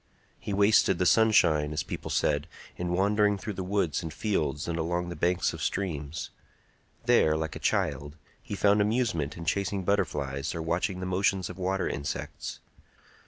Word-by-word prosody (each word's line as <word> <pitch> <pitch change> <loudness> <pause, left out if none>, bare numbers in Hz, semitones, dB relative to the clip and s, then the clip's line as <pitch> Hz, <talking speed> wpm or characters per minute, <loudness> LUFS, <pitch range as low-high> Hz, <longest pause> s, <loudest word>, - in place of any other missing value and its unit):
He - - -5
wasted 100 -2 +4
the 90 - +1
sunshine, 85 -9 +4
as 75 - -1
people - - -6
said, 75 +2 +1 0.3
in 90 0 -3
wandering 105 +2 +3
through 105 +2 -5
the 95 - -5
woods 90 -5 0
and 80 -2 -5
fields 75 -4 -1
and 85 0 -2
along 85 +2 -1
the 85 - -5
banks 90 +1 +1
of - - -7
streams. 80 -5 -3 0.7
There, 80 0 +4
like 80 0 -3
a - - -6
child, 75 +1 -1 0.3
he 105 - -6
found 100 +1 +4
amusement 105 - 0
in 85 - -7
chasing 100 +2 -1
butterflies 75 -9 -1
or 85 - -3
watching 90 +3 -1
the - - -3
motions 95 0 0
of 90 - -12
water 95 +1 0
insects. 70 +1 -5
90 Hz, 165 wpm, -28 LUFS, 80-100 Hz, 0.7 s, wasted